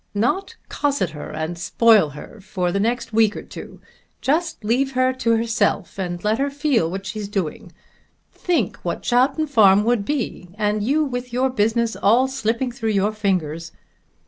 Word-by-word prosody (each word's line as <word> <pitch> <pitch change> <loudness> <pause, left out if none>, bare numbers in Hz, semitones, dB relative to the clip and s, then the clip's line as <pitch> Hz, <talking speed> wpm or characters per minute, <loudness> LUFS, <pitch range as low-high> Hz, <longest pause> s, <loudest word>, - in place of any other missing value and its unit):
"Not 245 - 0
cosset 280 - -1
her 150 -1 -8
and 160 +2 -4
spoil 215 -2 +4
her 215 +7 -11
for 185 -3 -2
the 200 - -1
next 230 +2 -1
week 220 -1 +3
or - - -6
two. - - -10 0.4
Just 315 -2 -1
leave 260 +5 +1
her 255 0 +2
to 230 -3 +1
herself 220 -4 -1
and 175 -2 -4
let 215 +3 +1
her 280 +1 +1
feel 280 - +1
what 195 +2 -5
she's 205 +1 -5
doing. 195 -6 -4 0.6
Think 315 - -1
what 170 - -4
Chowton 260 +6 +2
Farm 210 -8 +5
would 235 -2 +1
be, 235 -8 -3
and 210 0 0
you 285 +9 +2
with 250 -3 -4
your 255 +2 +1
business 225 0 +1
all 235 +6 +3
slipping 250 -1 -1
through 225 -2 -3
your 200 +2 +2
fingers." 170 -6 -2
225 Hz, 170 wpm, -21 LUFS, 195-255 Hz, 0.6 s, Farm